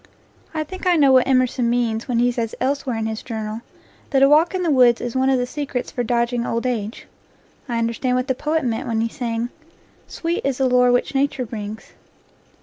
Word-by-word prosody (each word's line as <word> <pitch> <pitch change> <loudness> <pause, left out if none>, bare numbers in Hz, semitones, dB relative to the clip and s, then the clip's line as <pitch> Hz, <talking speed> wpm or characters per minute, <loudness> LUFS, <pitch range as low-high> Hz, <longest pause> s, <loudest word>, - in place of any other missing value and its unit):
I 310 -1 -2
think 370 +3 -6
I 355 - +5
know 285 -4 +5
what 260 -1 +5
Emerson 255 -2 +2
means 235 -2 0
when 245 -3 0
he 245 +1 +3
says 230 -2 -3
elsewhere 265 -2 -1
in 220 - -2
his 220 0 -3
Journal 220 -1 -5 0.5
that 270 -2 +3
a - - +8
walk 320 +5 +4
in 365 - -1
the 335 - +1
woods 250 -3 +5
is 240 0 -5
one 260 +1 +2
of 265 - +3
the 245 - 0
secrets 265 -1 -4
for 245 - -2
dodging 235 +1 0
old 230 0 -2
age. 230 -3 -3 0.6
I 235 - -1
understand 230 +2 0
what 255 +1 -1
the 260 - +2
poet 300 +3 -1
meant 225 -2 -2
when 225 -1 0
he 230 - 0
sang: 235 -2 -3 0.6
"Sweet 335 +1 -3
is 275 -2 -1
the 265 - +2
lore 250 0 +4
which 245 +2 +1
Nature 270 -2 0
brings." 215 -1 -7
250 Hz, 215 wpm, -21 LUFS, 230-270 Hz, 0.6 s, a